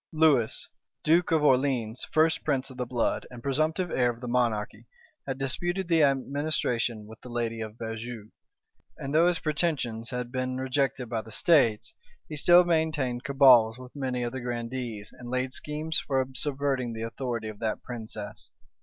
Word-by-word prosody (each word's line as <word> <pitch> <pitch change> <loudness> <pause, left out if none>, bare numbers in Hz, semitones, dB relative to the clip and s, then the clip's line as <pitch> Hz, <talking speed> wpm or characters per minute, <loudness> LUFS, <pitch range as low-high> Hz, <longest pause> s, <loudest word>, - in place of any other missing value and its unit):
Lewis, 155 -8 +2 0.4
duke 165 +3 +3
of 160 -2 +3
Orleans, 130 -4 +2
first 160 +1 +3
prince 135 -2 0
of 130 - -12
the 125 -1 -3
blood, 120 -1 -1
and 120 -2 -11
presumptive 155 +6 0
heir 125 -1 +2
of 120 -1 -5
the 125 - -6
monarchy, 120 -3 -1 0.4
had 135 -1 -2
disputed 175 +8 -2
the 165 -2 +3
administration 135 -5 0
with 110 +1 -13
the 125 - -10
lady 115 -1 -2
of 110 0 -6
Beaujeu; 115 -1 -6 0.7
and 140 -1 -5
though 165 +3 +5
his 175 -1 +3
pretensions 145 -9 -1
had 125 -1 -4
been 130 0 -2
rejected 130 -1 -1
by 110 -1 -2
the 110 - -14
states, 115 - +3 0.3
he 155 - -6
still 175 +4 +6
maintained 155 -7 0
cabals 125 -5 +6
with 130 +1 -12
many 130 -3 -2
of 120 - -2
the 130 0 -5
grandees, 120 -3 -4
and 120 -1 -8
laid 130 +1 -1
schemes 155 +2 -1
for 135 -2 0
subverting 135 -2 -1
the 110 0 -5
authority 115 -1 -3
of 110 -1 -8
that 110 -1 -2
princess. 110 -3 -7
130 Hz, 170 wpm, -28 LUFS, 115-145 Hz, 0.7 s, still